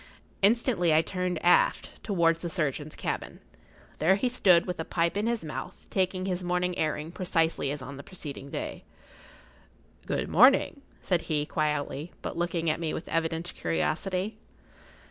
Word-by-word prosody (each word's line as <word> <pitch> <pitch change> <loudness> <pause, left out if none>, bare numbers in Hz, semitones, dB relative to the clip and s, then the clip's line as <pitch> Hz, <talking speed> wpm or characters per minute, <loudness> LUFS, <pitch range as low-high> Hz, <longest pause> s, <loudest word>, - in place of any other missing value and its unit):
Instinctively 200 - +3
I 160 - +5
turned 180 0 -2
aft, 175 - +3
towards 170 -5 +2
the 170 - -3
surgeon's 155 -3 -2
cabin. - - -4 0.6
There 175 +5 +4
he 250 +6 0
stood, 185 -8 +4
with 180 -2 -4
a - - -1
pipe 170 +1 0
in 210 +2 0
his 235 -7 -1
mouth, 165 +4 -5 0.2
taking 185 -1 0
his 180 -1 -2
morning 180 0 0
airing 155 0 -2
precisely 165 -5 0
as 145 -1 -4
on 135 +2 -8
the 140 - -9
preceding 145 -6 -7
day. - - -5 1.2
"Good - - -1
morning," 280 - +5 0.2
said 180 -3 +1
he, 150 -2 +1
quietly, 150 0 -2
but - - -4
looking 170 -1 -1
at 155 - +1
me 165 -2 -2
with - - -6
evident 165 +1 -1
curiosity. 180 - -1
170 Hz, 155 wpm, -28 LUFS, 155-185 Hz, 1.2 s, I